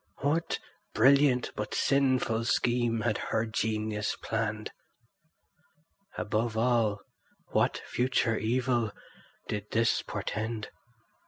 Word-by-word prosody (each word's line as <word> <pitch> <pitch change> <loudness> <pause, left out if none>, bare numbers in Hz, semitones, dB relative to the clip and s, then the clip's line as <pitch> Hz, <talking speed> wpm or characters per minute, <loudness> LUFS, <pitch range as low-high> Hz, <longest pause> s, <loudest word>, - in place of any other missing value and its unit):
What 150 +4 +1 0.4
brilliant 135 -2 +4
but 105 0 -4
sinful 130 -4 +2
scheme 120 -1 +1
had 105 -1 0
her 110 - -1
genius 110 -1 -1
planned? 110 -1 -2 1.5
Above 110 +2 -1
all, 115 -4 +2 0.5
what - - +1
future 125 -2 +1
evil 120 -1 0 0.5
did 105 0 -3
this 115 +1 +2
portend? 110 0 -4
115 Hz, 90 wpm, -29 LUFS, 110-125 Hz, 1.5 s, brilliant